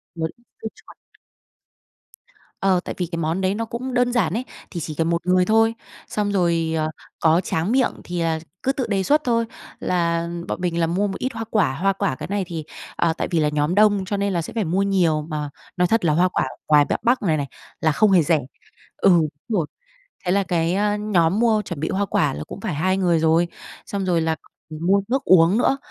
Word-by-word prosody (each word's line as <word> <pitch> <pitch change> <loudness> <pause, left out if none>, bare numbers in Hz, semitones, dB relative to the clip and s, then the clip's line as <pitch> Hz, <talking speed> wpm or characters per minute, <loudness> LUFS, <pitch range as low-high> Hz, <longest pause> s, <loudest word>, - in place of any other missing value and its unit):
một 160 -1 -1
ít 240 - -29 0.2
dưa - - -3
chuột. - - -17 1.7
Ờ, 190 -2 +3
tại - - -5
vì 180 - -1
cái 170 - -3
món 165 +3 -1
đấy 190 +1 +1
nó 230 +1 -2
cũng 250 +3 -5
đơn 245 0 +2
giản 195 -9 +1
ấy, 245 +4 -2 0.3
thì 175 - -4
chỉ 155 -1 -5
cần 165 +1 0
một 170 0 -1
người 180 0 +4
thôi. 225 +2 +3 0.3
Xong 205 -1 -1
rồi, 170 -4 +1
ờ, 155 0 0 0.3
có 165 +2 +4
tráng 170 +5 -1
miệng 260 0 +3
thì, 175 0 -4
à, 165 -1 0 0.2
cứ 270 - +2
tự 265 -3 -2
đề 195 -3 0
xuất 300 +8 +3
thôi, 230 -2 +1 0.3
là 170 -1 0 0.2
bọn - - -4
mình 170 -1 -1
là 165 - +2
mua 190 +5 0
một 195 - -5
ít 260 0 -2
hoa 225 - -4
quả 200 -11 +2
hoa 195 +6 +1
quả 160 -8 -1
cái - - -7
này 200 0 -1
thì 165 -2 -5 0.3
à, 165 - +1
tại - - -1
vì 170 - +2
là 150 -1 +2
nhóm 150 +3 0
đông 205 -2 +4
cho 200 +2 -2
nên 200 -1 0
là 170 - 0
sẽ 160 - -8
phải 225 - 0
mua 180 +3 0
nhiều, 175 -6 +2
mà 150 -2 -3 0.3
nói 180 0 +3
thật 225 -3 +1
là 155 - +3
hoa 175 +4 +4
quả 155 - 0 0.2
ngoài 150 -1 +5
b - - -6
Bắc 245 +2 +3
này 160 -5 +2
này 140 -1 -2 0.3
là 160 - +3
không 210 +6 +3
hề 180 -3 +6
rẻ. 160 0 +2 0.6
Ừ, - - +4
đúng 165 -3 +4 0.3
rồi. 155 - -1 0.6
Thế 180 - +1
là 200 +1 +3
cái 170 -1 0 0.2
nhóm 195 -3 +2
mua 225 -2 +3
chuẩn 190 - -6
bị 160 - -2
hoa 200 +1 0
quả - - +1
là 75 - -5
cũng - - -9
phải - - -2
2 185 +5 +1
người 175 -3 +2
rồi, 165 +2 +3 0.4
xong 200 -1 -3
rồi 175 -3 +2
là 160 0 0
còn 155 +1 -10
mua 200 +1 +4
nước 265 +3 0
uống 180 +2 +5
nữa, 270 +3 +2
180 Hz, 235 wpm, -22 LUFS, 165-205 Hz, 1.7 s, hề